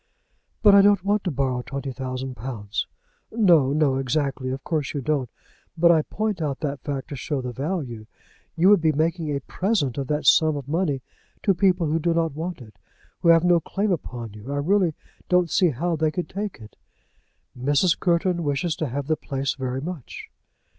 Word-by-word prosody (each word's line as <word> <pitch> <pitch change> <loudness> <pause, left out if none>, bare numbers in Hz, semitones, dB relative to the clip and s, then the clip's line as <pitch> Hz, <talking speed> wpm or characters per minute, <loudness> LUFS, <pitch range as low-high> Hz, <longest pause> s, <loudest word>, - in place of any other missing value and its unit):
"But 205 -2 +8
I 200 - +8
don't 200 -2 +4
want 205 +1 +1
to - - +1
borrow 130 -4 -1
twenty 135 +1 -5
thousand 130 0 -5
pounds." 110 -4 -4 0.4
"No, 175 - +4
no; 145 -3 +2
exactly. 135 -1 -1
Of 135 +1 -4
course 155 -5 -2
you 140 - -1
don't. 135 -2 -1 0.5
But 170 +1 +6
I 160 -2 +4
point 210 +2 -3
out 145 -3 -2
that 145 -3 -2
fact 140 -3 -5
to 145 - -5
show 140 +2 -3
the 125 -1 -4
value. 130 - -4 0.5
You 175 +4 +4
would 205 -4 +6
be 160 -1 +3
making 160 +1 0
a 140 -1 -2
present 155 - -1
of 135 - -3
that 150 +1 -1
sum 155 -2 +5
of 140 -2 -7
money 150 -4 -1 0.4
to 195 - +4
people 180 -1 +2
who 155 +2 0
do 165 +1 +1
not 165 -3 +1
want 160 -2 -5
it, 105 -5 -18 0.4
who 170 - +2
have 165 0 +6
no 175 -1 +4
claim 200 +5 -2
upon 120 - -4
you. 105 +6 -9
I 145 - -2
really 175 +2 +2 0.3
don't 180 -2 +3
see 180 -3 +4
how 165 +5 -1
they 155 0 +1
could 180 +3 -4
take 205 +1 -4
it." 110 -2 -14 0.8
"Mrs. 145 +7 +2
Courton 175 0 +1
wishes 145 +3 -1
to 155 - -2
have 140 +2 -3
the 155 +2 +1
place 135 -2 -3
very 130 -1 -3
much." 165 -4 -7
150 Hz, 195 wpm, -24 LUFS, 135-175 Hz, 0.8 s, But